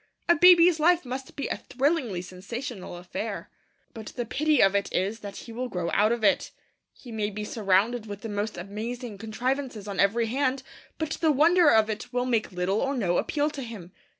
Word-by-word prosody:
A 345 - +6
baby's 350 0 +7
life 345 0 +3
must 260 +1 -6
be 280 - -3
a - - -2
thrillingly 260 - -1
sensational 195 +2 -7
affair. 195 +4 -6 0.4
But 220 -1 -9
the 240 -1 -2
pity 305 +5 +1
of 195 0 +5
it 200 0 0
is 200 +5 -1
that 205 -2 -8
he 230 - -9
will 250 +2 -4
grow 175 -4 -3
out 210 +2 +3
of 235 -2 -1
it. 205 - +3 0.4
He 245 - -13
may 215 -2 -1
be 210 0 -5
surrounded 215 +2 +1
with 205 0 -7
the 225 - -5
most 205 +1 -3
amazing 215 +4 -6
contrivances 240 0 -3
on 200 -2 -5
every 225 +4 +3
hand, 260 +2 0 0.3
but 315 -1 -3
the 320 -2 +4
wonder 330 +3 +5
of 220 -3 +5
it 220 +3 -5
will 250 0 0
make 230 -5 0
little 180 +3 0
or 275 +1 0
no 175 -7 +1
appeal 295 0 0
to 280 - -6
him. 215 -8 -8
230 Hz, 200 wpm, -27 LUFS, 205-270 Hz, 0.4 s, baby's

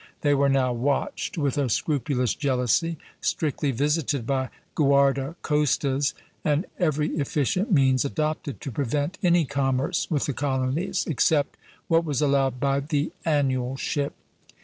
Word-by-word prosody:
They 145 -1 +3
were 140 0 +3
now 130 -2 +2
watched 135 +7 -1
with 145 -2 0
a 135 -3 +1
scrupulous 125 -1 0
jealousy, 140 +4 0 0.2
strictly 150 -1 -1
visited 145 0 0
by 130 0 -1 0.2
guarda 140 0 +2
costas, 145 -2 +1 0.3
and 150 +3 +1
every 155 -4 +1
efficient 150 - 0
means 135 -5 +4
adopted 155 -1 -2
to 135 - -5
prevent 145 - -2
any 175 -3 +4
commerce 135 0 0
with 150 -4 0
the 145 - -2
colonies, 135 +6 -1
except 145 -1 +2 0.3
what 165 0 +3
was 145 -5 -1
allowed 135 -3 +2
by 140 +1 +1
the 145 +1 -1 0.2
annual 135 -4 +1
ship." 140 +1 -2
140 Hz, 135 wpm, -25 LUFS, 135-150 Hz, 0.3 s, means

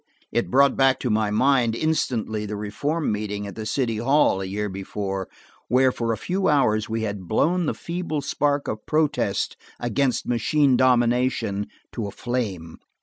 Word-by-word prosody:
It 120 - 0
brought 140 +2 +4
back 135 -1 +3
to 125 - 0
my 105 -1 +1
mind 120 +1 +3
instantly 115 -8 -1
the 105 - -4
reform 140 +10 -2
meeting 105 -1 -3
at 100 - -7
the 110 -1 -6
city 115 -3 0
hall 120 -4 +3
a - - -3
year 105 +2 -2
before, 95 0 -4 0.4
where 130 +2 +4
for 115 -2 -2
a 110 - -1
few 185 - -1
hours 110 -8 +2
we 110 0 -2
had 100 -4 -4
blown 170 - +1
the - - -1
feeble 170 -3 -3
spark 145 0 0
of 110 - -5
protest 155 -1 0 0.2
against 125 +2 0
machine 135 +3 +2
domination 120 -4 +2 0.3
to 115 -4 -3
a - - -6
flame. 100 -11 -4
120 Hz, 165 wpm, -24 LUFS, 105-140 Hz, 0.4 s, brought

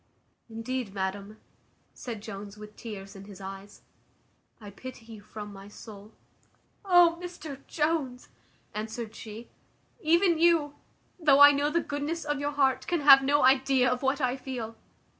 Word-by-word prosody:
"Indeed, 225 -1 -4
madam," 200 +2 -4 0.6
said 225 -4 -7
Jones, 205 -1 -8
with 210 0 -12
tears 205 -3 -9
in 195 0 -11
his 200 -2 -12
eyes, 195 +1 -10 0.8
"I 205 -2 -10
pity 245 +2 -10
you 225 -2 -11
from 210 0 -9
my 195 0 -11
soul." 205 0 -12 0.7
"O! 350 -3 +5
Mr 330 -6 -8
Jones," 300 -5 -1 0.5
answered 220 +1 -5
she, 225 +1 -10 0.5
"even 340 0 +3
you, 330 -4 +3 0.5
though 290 -4 +5
I 285 0 +11
know 290 +1 0
the 335 +3 +1
goodness 295 +3 -4
of 295 -1 -2
your 285 0 -1
heart, 270 -2 +1
can 345 -3 0
have 275 -1 +9
no 285 +2 +2
idea 265 -1 +4
of 250 - -2
what 270 +1 0
I 255 -1 0
feel. 240 -4 -6
255 Hz, 150 wpm, -28 LUFS, 210-290 Hz, 0.8 s, I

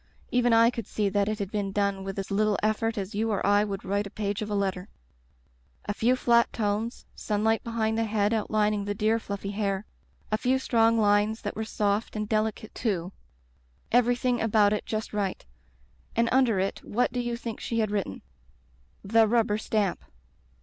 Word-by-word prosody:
Even 245 -1 +3
I 230 +1 +6
could 230 -4 -6
see 210 -2 0
that 200 +1 +1
it 215 - -2
had 200 -2 -4
been 205 -2 -2
done 200 -1 0
with 195 0 -5
as 195 0 -4
little 210 +1 +2
effort 220 +1 0
as 195 +2 -4
you 220 +2 0
or 205 -3 -1
I 205 0 +4
would 200 -2 -4
write 200 +1 -1
a - - -9
page 205 0 -3
of 215 - -4
a 205 - -1
letter. 195 -1 -2 1.0
A 205 - -2
few 235 +4 +2
flat 235 -2 +3
tones 215 +2 -2
— - - -37
sunlight 220 +1 0
behind 225 -1 -1
the 225 - +1
head 210 0 +1
out 220 -2 -1
lining 210 -1 +1
the 205 0 -2
dear 220 +2 +2
fluffy 200 -2 -5
hair; 200 -1 -2 0.5
a 215 - +1
few 255 +3 +2
strong 230 -3 +3
lines 210 +1 +2
that 205 - -4
were 220 - -2
soft 210 0 -1
and 210 0 -2
delicate, 220 0 -1
too; 190 -6 -2 0.8
everything 245 +1 +2
about 215 -2 +3
it 210 - -3
just 215 0 -3
right 200 -3 -2 0.4
— 65 +1 -32
^and 230 0 +3
under 245 -6 +3
it 195 +1 -2
what 245 +4 0
do 250 - -1
you 240 -1 -2
think 230 -2 -6
she 230 - -3
had 215 -2 +1
written? 195 - -3 0.8
'The 220 +2 +4
Rubber 220 -2 +2
Stamp. 210 -4 -1
215 Hz, 200 wpm, -27 LUFS, 200-225 Hz, 1.0 s, I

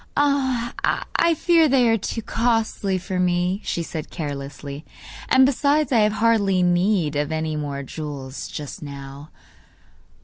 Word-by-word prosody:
'I 280 +3 +1
fear 330 -2 +4
they 255 -3 +4
are 225 - +4
too 225 +1 -4
costly 225 -5 0
for 185 0 -4
me,' 180 +2 +1
she 170 - -2
said 160 -2 -6
carelessly; 145 -1 -6 0.5
'and 260 0 +6
besides, 285 +1 +2
I 240 - +4
have 210 0 +3
hardly 210 -5 +2
need 175 -3 +2
of 145 +1 -1
any 160 0 -2
more 140 -2 -4
jewels 140 -2 -6
just 145 -2 -7
now. 140 0 -9
185 Hz, 135 wpm, -23 LUFS, 150-235 Hz, 0.5 s, and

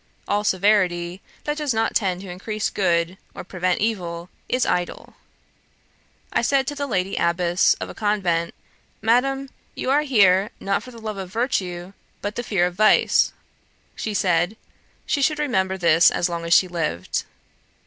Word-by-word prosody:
All 205 +1 +1
severity 185 -3 +1 0.2
that 295 0 -2
does 295 -6 -1
not 225 0 +1
tend 185 -4 0
to 195 - -9
increase 210 +4 -3
good, 175 -1 0 0.2
or - - -6
prevent 185 -1 -1
evil, 175 -5 -2 0.2
is 255 0 +1
idle. 175 0 -2 1.2
I - - +2
said 270 +2 +2
to 290 - -3
the 285 -1 -3
Lady 195 -5 -1
Abbess 170 +1 +2
of - - -6
a - - -8
convent, 185 -6 0 0.4
"Madam, 270 +5 +1 0.3
you 260 - -2
are 290 +2 +4
here, 205 -8 +4
not 195 0 -1
for - - -11
the 240 - -12
love 215 -2 -5
of 190 -2 -6
virtue, 190 -6 -2 0.3
but 205 +1 -4
the - - -2
fear 195 -7 +1
of 180 - -2
vice." 215 +4 +4 0.6
She 215 -2 -4
said, 180 +1 +1 0.5
"She 285 - 0
should 300 +2 +2
remember 190 -11 0
this 170 -2 +5
as 175 - 0
long 170 -1 -4
as 170 - +2
she 185 - +5
lived."' 155 - -2
195 Hz, 165 wpm, -23 LUFS, 175-225 Hz, 1.2 s, this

